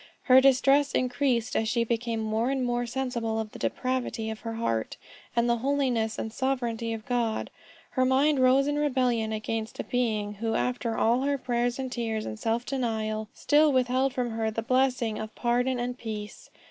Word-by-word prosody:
Her 260 0 +7
distress 275 +1 +4
increased 250 -2 0
as 220 0 +1
she 235 0 +1
became 230 -1 -1
more 220 +3 0
and 265 -2 0
more 240 0 -1
sensible 235 -3 -2
of 215 -1 -4
the - - -10
depravity 255 -3 -2
of 220 - -7
her 225 0 -5
heart, 115 - -2 0.4
and 235 0 +2
the 235 0 +2
holiness 250 -4 0
and 220 - -4
sovereignty 240 -3 -1
of 225 -1 -5
God. 235 -3 -1 0.4
Her 255 - +1
mind 270 +3 +3
rose 260 +2 +5
in 290 +1 0
rebellion 250 -6 +1
against 220 +1 -3
a - - -1
Being, 215 -4 -1
who 225 +2 -2
after 245 -2 -1
all 235 +3 +3
her 280 +1 +1
prayers 245 -1 -1
and 260 -1 -4
tears 225 -3 -2
and 215 - -6
self 230 +1 -1
denial, 220 -5 -2
still 300 +1 +4
withheld 260 +1 +2
from 250 -3 -2
her 225 0 -1
the 220 +1 -3
blessing 255 -3 +1
of 215 0 -7
pardon 245 +1 +1
and 245 +1 -3
peace. 215 -2 -7
240 Hz, 185 wpm, -27 LUFS, 225-260 Hz, 0.4 s, Her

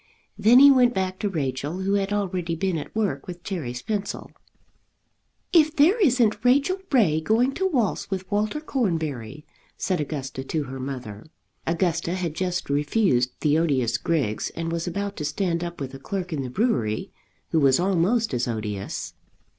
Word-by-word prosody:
Then 235 +3 +5
he 280 +2 +9
went 250 -2 +4
back 185 0 -1
to 205 - -1
Rachel, 145 +1 -3
who 195 +1 0
had 200 0 0
already 185 -4 -1
been 185 +2 -1
at 150 - -9
work 195 -11 -1
with 175 -1 -8
Cherry's 125 -11 -4
pencil. 205 -2 -4 1.2
"If 310 -2 +5
there 355 +11 +4
isn't 235 - +3
Rachel 280 +9 +3
Ray 170 - +3
going 235 +9 +2
to 380 +5 0
waltz 245 - 0
with 190 -1 -3
Walter 210 +8 0
Cornbury," 155 - -2 0.3
said 185 -4 -1
Augusta 135 -3 -4
to 150 +3 -2
her 135 -1 -7
mother. 125 -5 -6 0.4
Augusta 170 +1 0
had 175 -4 -2
just 180 +1 -2
refused 145 - +1
the 150 0 +3
odious 130 -8 +1
Griggs, 135 -11 -1
and 165 0 -3
was 170 +1 -2
about 200 +3 -3
to 150 - -4
stand 170 +3 -1
up 175 0 -6
with 135 -1 -5
a 135 - -8
clerk 180 +4 -4
in 145 - -2
the 130 - -4
brewery, 125 - 0 0.4
who 160 - +3
was 135 -1 +4
almost 195 - +1
as 125 0 0
odious. 100 -7 -4
175 Hz, 170 wpm, -24 LUFS, 140-205 Hz, 1.2 s, he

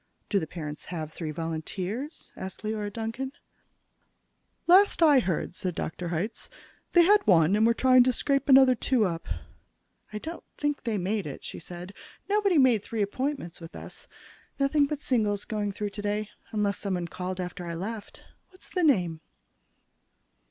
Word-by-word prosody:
"Do 200 - +4
the 160 - -4
parents 150 -3 -7
have 160 -3 -5
three 160 -3 -5
volunteers?" 180 - -4
said 190 - -5
Leora 215 -1 -2
Duncan. 230 +5 -4 1.3
"Last 370 0 +6
I 295 -4 +7
heard," 185 -9 -1
said 180 -1 -4
Dr. 170 +2 -4
Hitz, 190 +8 -3 0.4
"they 345 - +7
had 410 +4 +4
one, 170 -1 +5
and 220 +2 +4
were 235 - +3
trying 255 0 +6
to 255 - +4
scrape 275 +2 0
another 265 -1 +8
two 245 -2 +2
up." 170 -3 -3 0.8
"I 210 - -4
don't 320 +10 -6
think 290 -3 -1
they 225 -3 0
made 195 0 -1
it," 140 - -7
she - - -6
said. 175 +3 -9 0.3
"Nobody 400 -4 +3
made 255 -6 +5
three 220 0 -2
appointments 255 - -3
with 165 - -10
us. - - -6 0.5
Nothing 280 +1 +3
but 295 0 -4
singles 210 -7 +1
going 210 -2 -2
through 205 +1 -4
today, 210 +1 -2 0.2
unless 205 -2 0
somebody 185 -4 -2
called 185 +2 -5
in 180 - -1
after 180 0 -7
I 170 - -4
left. 205 +4 -6 0.3
What's 370 0 -13
the 360 - 0
name?" 175 - +2
210 Hz, 165 wpm, -28 LUFS, 180-265 Hz, 1.3 s, another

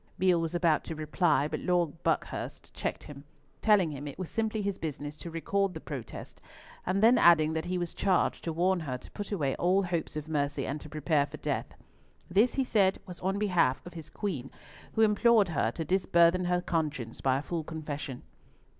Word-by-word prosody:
Beale 180 -2 +3
was 165 +1 -2
about 170 -3 +2
to 160 - -5
reply, 155 -1 +1
but - - -3
Lord 175 -3 0
Buckhurst - - -2
checked - - -3
him, 140 -1 -10 0.4
telling 200 -7 +4
him 145 0 -6
it 140 - -7
was 185 -2 -6
simply 220 -1 -1
his 200 -1 -2
business 145 -1 -5
to 170 - -7
record 190 +3 -1
the - - -4
protest; 135 -8 -8 0.5
and 195 +3 +1
then 240 +3 +6
adding 160 -2 +6
that 160 +1 -2
he 180 +1 -1
was 175 -1 -3
charged 190 -3 +1
to 165 - -1
warn 180 +3 +2
her 135 -6 -4
to 125 - -15
put 205 0 -6
away 145 -9 0
all 185 +3 +3
hopes 175 -4 -2
of 155 0 -4
mercy, 145 -3 -1
and 145 +2 -4
to 155 - -10
prepare 150 -1 +1
for - - -9
death. - - -3 0.6
This, 210 +7 +3
he 270 - +2
said, 200 -6 +2
was 180 -2 -9
on 190 +2 -1
behalf 180 -11 +2
of 175 - -9
his 160 -3 -9
Queen, 150 - -4 0.4
who 220 - +1
implored 215 -1 +4
her 145 -8 +1
to 160 +7 -4
disburthen 180 0 +3
her 180 0 +1
conscience 150 -9 -2
by 130 -1 +2
a 140 - -4
full 170 -1 -3
confession. 150 -4 -6
170 Hz, 200 wpm, -30 LUFS, 150-190 Hz, 0.6 s, then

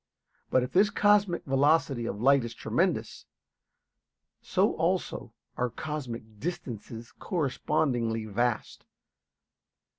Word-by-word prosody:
But 130 - +3
if 125 - -4
this 200 +3 +4
cosmic 205 -3 +3
velocity 135 -3 +2
of 100 - -4
light 140 -1 +5
is 120 0 -6
tremendous, - - -1 1.1
so - - +1
also - - -1 0.3
are 125 0 0
cosmic 120 -7 -6
distances 120 - -6
correspondingly 125 - 0
vast. 115 +2 -2
130 Hz, 95 wpm, -28 LUFS, 115-155 Hz, 1.1 s, light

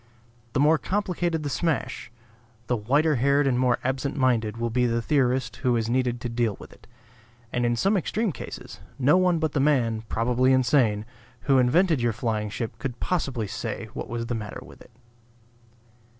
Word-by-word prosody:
The - - +1
more 150 +2 +4
complicated 175 -5 -1
the 145 - -2
smash, 150 -8 -2 0.5
the 125 - 0
whiter 140 +7 +2
haired 140 +3 +3
and 125 -2 +2
more 125 -1 +3
absent 135 +2 -2
minded 115 -5 +1
will 115 0 -2
be 125 +1 +2
the 115 0 0
theorist 125 -1 0
who 125 -1 +1
is 115 0 -1
needed 125 -1 0
to 125 - -3
deal 115 -3 -1
with - - -12
it; - - -21 0.7
and 120 -1 +1
in 120 - +1
some 195 - +2
extreme 205 +3 0
cases, - - -9 0.2
no 140 +4 +4
one 180 -2 +3
but 160 -2 -1
the 145 - -1
man 125 -6 +2
(probably 125 +3 +2
insane) 120 -5 +2 0.4
who 135 -2 +3
invented 155 +4 +3
your 120 -1 +1
flying 110 -2 -2
ship 115 +2 -5
could 125 -3 -5
possibly 135 -10 -1
say 100 - -5
what - - -6
was 115 0 -3
the 120 - -3
matter 105 -3 -5
with - - -15
it. - - -15
125 Hz, 180 wpm, -25 LUFS, 115-145 Hz, 0.7 s, more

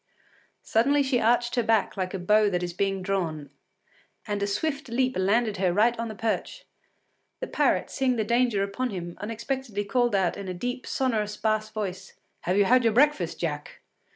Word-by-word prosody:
Suddenly 280 +6 +3
she 265 -2 +1
arched 240 +2 +2
her 245 - +2
back 225 -1 +1
like 185 -1 -3
a - - -1
bow 210 +3 +3
that 180 -2 -1
is 175 -1 -3
being 195 +1 -1
drawn, 170 -6 -2 0.7
and 205 -2 -3
a 200 - +1
swift 275 +7 -2
leap 255 +2 0
landed 205 +3 +1
her 185 -1 +2
right 220 +6 +3
on 230 - -2
the 215 - -7
perch. 225 +2 -3 0.7
The - - -3
parrot, - - +1
seeing 260 -2 +1
the 220 - 0
danger 235 -2 +2
upon 225 +6 -2
him, 175 -4 -6
unexpectedly 230 0 -3
called 240 0 +1
out 190 -3 +1
in 200 -1 -6
a 185 - -4
deep, 245 +7 -4
sonorous 215 -5 -1
bass 215 0 0
voice: 195 -3 -5 0.3
“Have 180 +2 +1
you 205 - +5
had 250 +4 +4
your 225 -2 +3
breakfast, 250 - +2
Jack? 150 -3 -4
215 Hz, 185 wpm, -26 LUFS, 195-245 Hz, 0.7 s, you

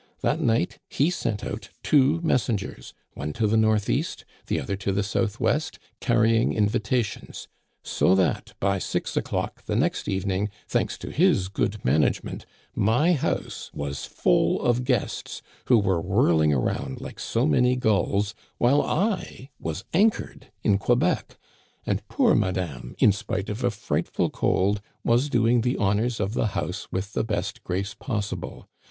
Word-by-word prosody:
That 155 - +1
night 115 - +1
he 150 +6 +2
sent 115 -11 -2
out 105 -1 -5
two 145 +2 +4
messengers, 115 - -1 0.2
one 75 +1 -4
to 115 - 0
the 105 +1 +2
northeast, 110 -2 +1 0.2
the - - 0
other 100 - -3
to 100 0 -2
the 100 +1 0
southwest, 115 +9 0 0.2
carrying 115 -1 +3
invitations; 110 +1 -1 0.4
so 95 - +3
that 95 -1 0
by 100 -1 +1
six - - -2
o'clock - - -2
the - - -2
next - - 0
evening, 95 +1 -1 0.2
thanks - - 0
to - - -7
his 95 0 +3
good 100 +1 -2
management, 75 +4 +1 0.3
my 125 - +3
house 150 - -2
was 70 -1 -4
full - - +2
of 120 +1 +2
guests, 125 -5 -2 0.2
who 125 - +5
were 95 -5 +2
whirling 85 -5 +3
around 65 0 -1
like - - -8
so - - 0
many 125 +12 +3
gulls, 105 -3 +1 0.2
while 135 +4 +4
I 185 - -2
was 80 +5 -4
anchored 205 - +1
in 100 -2 +3
Quebec, 120 -3 +1 0.5
and - - -2
poor - - +3
madame, 85 -10 -1
in 105 - +6
spite 100 0 -3
of 105 +4 -4
a 125 - +3
frightful 110 -2 -1
cold, 100 +2 +1 0.2
was 120 +5 +2
doing 120 -1 +3
the 125 +2 0
honors 110 +4 +1
of 100 +1 -1
the 115 - +1
house 90 +4 -3
with 95 +3 -3
the - - 0
best 100 -4 -3
grace 95 +3 -2
possible. 105 - -4
105 Hz, 150 wpm, -25 LUFS, 95-120 Hz, 0.5 s, in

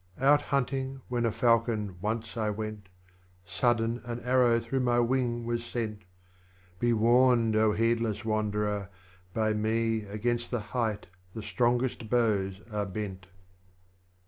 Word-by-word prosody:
5. 130 - -9
Out 145 +1 +5
bunting, 135 0 -1
when 120 -1 +1
a - - 0
Falcon, 115 -3 +1
once 110 +2 -3
I 110 -2 0
went; 105 -2 -5 0.6
Sudden 115 +3 0
an 120 -1 -5
Arrow 125 -2 +3
through 115 +3 -2
my 120 -1 +2
wing 120 -1 0
was 120 0 -2
sent. 110 -4 -4 0.7
Be 120 0 +2
warned, 120 0 +4 0.2
heedless 115 -2 0
Wanderer! 105 -2 -1 0.5
by 110 -1 +2
me. 110 +1 0
Against 120 +4 -2
the 120 - -1
Height 110 -2 -2 0.3
the 110 - -5
strongest 120 -1 0
Bows 105 -5 +1
are 105 -1 -2
bent. 95 -1 -6
115 Hz, 130 wpm, -29 LUFS, 105-120 Hz, 0.7 s, Out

